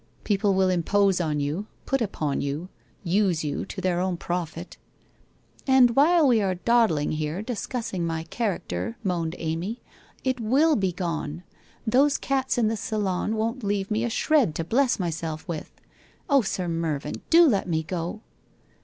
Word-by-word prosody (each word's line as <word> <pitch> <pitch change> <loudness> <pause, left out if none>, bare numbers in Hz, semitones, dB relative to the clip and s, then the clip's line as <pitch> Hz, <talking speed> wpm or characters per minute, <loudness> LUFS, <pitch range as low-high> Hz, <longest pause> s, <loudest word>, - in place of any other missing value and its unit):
People 200 -1 +1
will 190 0 +3
impose 190 +2 +2
on 155 -3 -1
you, 150 +9 -2 0.2
put 270 -2 0
upon 155 -10 -1
you, 145 +6 -3 0.3
use 180 -2 +1
you 145 -2 -3
to - - -6
their 180 -2 0
own 185 -1 -1
profit 175 0 -4 0.3
' - - -36
' - - -31
And 255 -3 +5
while 320 +2 +5
we 235 -4 +4
are 190 -2 0
dawdling 185 -7 +2
here 155 +5 -2
discussing 230 -5 -3
my 165 -1 -2
char 220 -7 0
acter,' 90 +6 -5
moaned 170 -3 -1
Amy, 170 +8 -3 0.2
' - - -30
it 255 - -7
will 280 +8 +3
be 190 -3 +1
gone! 170 -2 -4 0.4
Those 270 +5 +3
cats 265 -1 -1
in 235 -3 +3
the 225 +1 -1
salon 210 -1 -1
won't 230 +3 -2
leave 200 0 -1
me 215 +2 +1
a 235 - 0
shred 250 - +2
to 165 - -1
bless 245 +9 +2
myself 165 -3 -4
with. 165 -3 -5 0.6
Oh, 280 -3 +5
Sir 190 -4 -2
Mervyn, 165 -4 -2
do 340 +1 +7
let 200 -8 +1
me 160 -1 0
go 175 +5 -4
190 Hz, 170 wpm, -25 LUFS, 165-230 Hz, 0.6 s, do